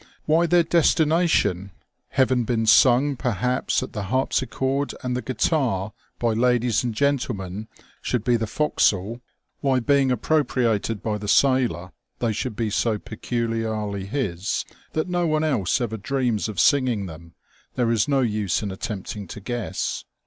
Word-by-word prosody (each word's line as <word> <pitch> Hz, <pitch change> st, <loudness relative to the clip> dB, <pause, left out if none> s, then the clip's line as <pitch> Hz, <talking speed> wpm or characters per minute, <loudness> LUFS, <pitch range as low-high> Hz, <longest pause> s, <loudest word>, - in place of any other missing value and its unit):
Why 165 Hz, +3 st, +3 dB
their 175 Hz, 0 st, +4 dB
destination, 160 Hz, -, +2 dB, 0.4 s
having 130 Hz, -2 st, +2 dB
been 115 Hz, -1 st, 0 dB
sung 130 Hz, +5 st, +5 dB
perhaps 125 Hz, +1 st, 0 dB
at -, -, -8 dB
the 105 Hz, -3 st, -4 dB
harpsichord 130 Hz, +4 st, -1 dB
and 125 Hz, -1 st, -1 dB
the 125 Hz, -, -2 dB
guitar 115 Hz, -, 0 dB, 0.2 s
by 115 Hz, -2 st, +1 dB
ladies 120 Hz, 0 st, +2 dB
and 120 Hz, -3 st, -2 dB
gentlemen, 110 Hz, -7 st, -1 dB, 0.3 s
should 120 Hz, -4 st, -1 dB
be 120 Hz, 0 st, +2 dB
the 115 Hz, -1 st, -1 dB
forecastle; 110 Hz, -4 st, 0 dB, 0.4 s
why 135 Hz, -2 st, +2 dB
being 140 Hz, +2 st, +2 dB
appropriated 115 Hz, -5 st, 0 dB
by 105 Hz, -1 st, -2 dB
the 105 Hz, -, -6 dB
sailor 120 Hz, -7 st, +2 dB, 0.3 s
they 115 Hz, -2 st, 0 dB
should 120 Hz, +1 st, -3 dB
be 110 Hz, -1 st, -2 dB
so 110 Hz, +1 st, +1 dB
peculiarly 110 Hz, -3 st, -3 dB
his, 100 Hz, -5 st, -2 dB, 0.3 s
that 155 Hz, -, -1 dB
no 175 Hz, -1 st, 0 dB
one 155 Hz, 0 st, +1 dB
else 125 Hz, -, +1 dB
ever 115 Hz, -3 st, -2 dB
dreams 120 Hz, -2 st, -1 dB
of 105 Hz, -, -5 dB
singing 125 Hz, -7 st, +3 dB
them, 85 Hz, -1 st, -11 dB, 0.4 s
there 120 Hz, -2 st, +1 dB
is 115 Hz, 0 st, +2 dB
no 140 Hz, -2 st, +2 dB
use 105 Hz, -5 st, 0 dB
in 100 Hz, -, -3 dB
attempting 100 Hz, +1 st, -5 dB
to -, -, -8 dB
guess. 120 Hz, +1 st, -3 dB
120 Hz, 150 wpm, -23 LUFS, 105-135 Hz, 0.4 s, sung